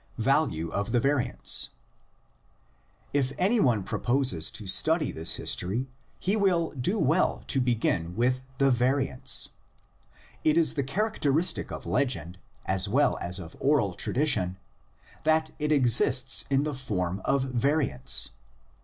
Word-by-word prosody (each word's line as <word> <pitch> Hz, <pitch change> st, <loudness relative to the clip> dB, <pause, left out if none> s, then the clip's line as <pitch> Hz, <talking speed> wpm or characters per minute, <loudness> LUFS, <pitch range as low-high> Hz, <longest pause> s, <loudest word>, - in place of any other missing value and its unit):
VALUE 125 Hz, -, 0 dB
OF 100 Hz, +4 st, -3 dB
THE 120 Hz, -, +3 dB
VARIANTS. 140 Hz, +1 st, +1 dB, 1.4 s
If 135 Hz, -2 st, 0 dB
any 205 Hz, +6 st, +2 dB
one 120 Hz, -, +2 dB
proposes 120 Hz, -, 0 dB
to 105 Hz, -, -8 dB
study 155 Hz, -, +2 dB
this 80 Hz, +1 st, +2 dB
history 115 Hz, +9 st, -2 dB, 0.3 s
he 195 Hz, +4 st, 0 dB
will 185 Hz, -6 st, +1 dB
do 155 Hz, -, -2 dB
well 165 Hz, 0 st, +1 dB
to 135 Hz, -, +1 dB
begin 105 Hz, -8 st, -1 dB
with 125 Hz, +2 st, 0 dB, 0.2 s
the 135 Hz, 0 st, +3 dB
variants. 130 Hz, +1 st, +1 dB, 0.9 s
It 155 Hz, +1 st, +2 dB
is 165 Hz, -2 st, +3 dB
the 145 Hz, -, -1 dB
char 205 Hz, +12 st, -1 dB
acteristic 160 Hz, -1 st, 0 dB
of -, -, -7 dB
legend 90 Hz, -, -2 dB, 0.3 s
as 95 Hz, +1 st, +2 dB
well 140 Hz, +7 st, +2 dB
as 90 Hz, +1 st, +1 dB
of 85 Hz, -3 st, -9 dB
oral 135 Hz, -10 st, +1 dB
tradition 95 Hz, -, -1 dB, 0.7 s
that 155 Hz, 0 st, +1 dB
it 150 Hz, 0 st, -1 dB
exists 130 Hz, -1 st, +3 dB
in 135 Hz, 0 st, +2 dB
the 150 Hz, 0 st, -3 dB
form 100 Hz, -8 st, -3 dB
of 135 Hz, -1 st, +1 dB
variants. 135 Hz, -, +1 dB
130 Hz, 135 wpm, -27 LUFS, 105-150 Hz, 1.4 s, THE